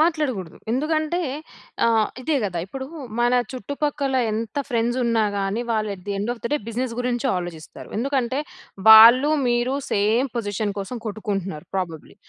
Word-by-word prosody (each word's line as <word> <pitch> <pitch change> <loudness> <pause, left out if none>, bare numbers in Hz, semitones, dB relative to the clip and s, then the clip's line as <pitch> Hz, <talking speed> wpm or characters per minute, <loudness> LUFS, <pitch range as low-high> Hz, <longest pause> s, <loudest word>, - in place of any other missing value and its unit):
మాట్లాడకూడదు. 290 - 0 0.2
ఎందుకంటే 310 +5 0 0.6
ఆహ్, 225 -2 +3
ఇదే 300 +3 +1
కదా! 180 -4 -2
ఇప్పుడు 265 +6 -6 0.3
మన 240 +1 +3 0.2
చుట్టుపక్కల 285 +1 -2 0.2
ఎంత 220 +3 -4
ఫ్రెండ్స్ 240 0 0
ఉన్నా 230 -2 +2
గాని, 200 +3 -1
వాళ్ళు 215 -1 0
at 185 - -15
the - - -3
end 210 +4 -2
of 235 - -10
the - - 0
day, 295 - +4
business 245 +1 -2
గురించి 245 0 -1
ఆలోచిస్తారు. 175 -3 -7
ఎందుకంటే, 260 0 0 0.5
వాళ్ళు 230 +6 +10 0.2
మీరు 240 +2 +1 0.2
సేమ్ 220 +6 +2
పొజిషన్ 205 -2 -2
కోసం 200 +6 -5
కొట్టుకుంటున్నారు 195 -6 -4
ప్రాబబ్లీ. 165 -5 -5
230 Hz, 145 wpm, -23 LUFS, 205-265 Hz, 0.6 s, వాళ్ళు